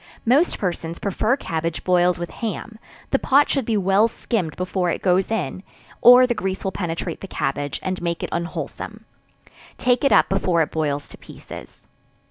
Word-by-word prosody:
Most 280 Hz, +9 st, +3 dB
persons 170 Hz, -3 st, -3 dB
prefer 215 Hz, +6 st, 0 dB
cabbage 165 Hz, -, -3 dB
boiled 180 Hz, -1 st, +3 dB
with 175 Hz, -1 st, -5 dB
ham; 220 Hz, 0 st, -5 dB, 0.3 s
the -, -, +3 dB
pot 285 Hz, +2 st, +4 dB
should 275 Hz, -4 st, 0 dB
be 220 Hz, -2 st, +1 dB
well 195 Hz, +3 st, +3 dB
skimmed 210 Hz, -, -3 dB
before 180 Hz, 0 st, -1 dB
it -, -, -3 dB
goes 185 Hz, 0 st, +2 dB
in 220 Hz, -4 st, -2 dB, 0.4 s
or 250 Hz, +1 st, +9 dB
the 245 Hz, -, 0 dB
grease 190 Hz, -4 st, -3 dB
will 190 Hz, -, -1 dB
penetrate 165 Hz, -4 st, -4 dB
the 195 Hz, -, -7 dB
cabbage, 145 Hz, -4 st, -3 dB
and 185 Hz, -1 st, -3 dB
make 170 Hz, -1 st, -2 dB
it -, -, -3 dB
unwholesome; 170 Hz, +1 st, -5 dB, 0.7 s
take 250 Hz, +1 st, +1 dB
it 275 Hz, -, +3 dB
up -, -, +5 dB
before 180 Hz, -3 st, +2 dB
it -, -, -6 dB
boils 145 Hz, -2 st, -2 dB
to -, -, -13 dB
pieces. -, -, -12 dB
185 Hz, 175 wpm, -22 LUFS, 170-225 Hz, 0.7 s, or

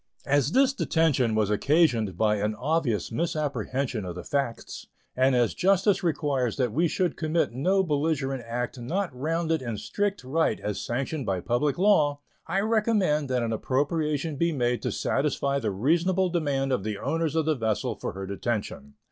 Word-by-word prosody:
As 145 Hz, +1 st, +2 dB
this 270 Hz, 0 st, +4 dB
detention 145 Hz, -, +1 dB
was 105 Hz, -1 st, +1 dB
occasioned 115 Hz, -, +2 dB
by 105 Hz, 0 st, +2 dB
an 105 Hz, +1 st, -1 dB
obvious 135 Hz, -4 st, -1 dB
misapprehension 140 Hz, -, -2 dB
of 90 Hz, -2 st, -6 dB
the 90 Hz, -, -7 dB
facts, 135 Hz, -5 st, -3 dB, 0.3 s
and 130 Hz, 0 st, +3 dB
as 120 Hz, -3 st, +2 dB
justice 195 Hz, +1 st, +2 dB
requires 145 Hz, -, 0 dB
that 125 Hz, -5 st, 0 dB
we 170 Hz, +4 st, +2 dB
should 180 Hz, 0 st, -1 dB
commit 160 Hz, +1 st, 0 dB
no 185 Hz, +11 st, +1 dB
belligerent 145 Hz, -5 st, -1 dB
act 120 Hz, +1 st, -3 dB
not 170 Hz, +5 st, -2 dB
rounded 160 Hz, +3 st, -1 dB
in 120 Hz, -4 st, -4 dB
strict 200 Hz, -, -2 dB
right 135 Hz, -2 st, 0 dB
as 105 Hz, -1 st, -3 dB
sanctioned 135 Hz, +3 st, -3 dB
by 95 Hz, -2 st, 0 dB
public 125 Hz, -, 0 dB
law, 155 Hz, -7 st, +3 dB, 0.3 s
I 195 Hz, -, 0 dB
recommend 210 Hz, -, +1 dB
that 125 Hz, -2 st, +1 dB
an 115 Hz, -1 st, -1 dB
appropriation 145 Hz, +5 st, -1 dB
be 170 Hz, +3 st, +1 dB
made 125 Hz, -4 st, 0 dB
to -, -, -2 dB
satisfy 140 Hz, 0 st, 0 dB
the 110 Hz, -, -1 dB
reasonable 170 Hz, -, +1 dB
demand 140 Hz, -5 st, 0 dB
of 125 Hz, -7 st, 0 dB
the 105 Hz, -1 st, -3 dB
owners 165 Hz, +4 st, -1 dB
of 160 Hz, -2 st, +1 dB
the 155 Hz, -, +2 dB
vessel 110 Hz, -6 st, -1 dB
for -, -, -5 dB
her 95 Hz, +1 st, -6 dB
detention. 100 Hz, -, -4 dB
140 Hz, 170 wpm, -26 LUFS, 120-165 Hz, 0.3 s, this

